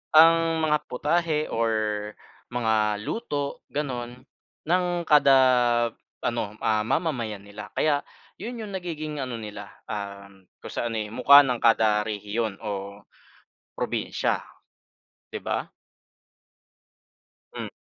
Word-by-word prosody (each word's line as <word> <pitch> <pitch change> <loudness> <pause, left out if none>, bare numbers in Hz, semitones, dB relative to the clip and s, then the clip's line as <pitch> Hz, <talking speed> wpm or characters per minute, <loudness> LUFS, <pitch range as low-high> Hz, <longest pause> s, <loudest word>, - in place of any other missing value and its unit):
ang 165 0 +6
mga 150 -1 +3
putahe 155 +3 0
or 115 0 +1 0.8
mga 110 -3 +1
luto 145 -12 -3
gano'n 125 -4 -4 0.5
ng 180 +2 +2 0.2
kada 145 -3 +6 0.9
ano, 110 -3 -2
ah, 110 -1 +1
mamamayan 120 - -1
nila. 100 0 -9
Kaya 145 -2 +2 0.4
'yon 240 +1 -5
yung 200 - -8
nagiging 155 -5 -4
ano 125 -3 -4
nila, 105 -1 -8 0.2
um, 100 -2 -7 0.2
kung - - -9
sa 120 - -1
ano, 115 - -3
eh, 105 0 -4
mukha 140 +3 +8
ng 125 -2 -1
kada 110 -2 +4
rehiyon 105 0 -3
o 100 -1 -5 0.8
probinsiya, - - -1 0.9
'di - - -4
ba? - - -2 1.8
Hmm. - - -5
120 Hz, 110 wpm, -26 LUFS, 105-150 Hz, 1.8 s, mukha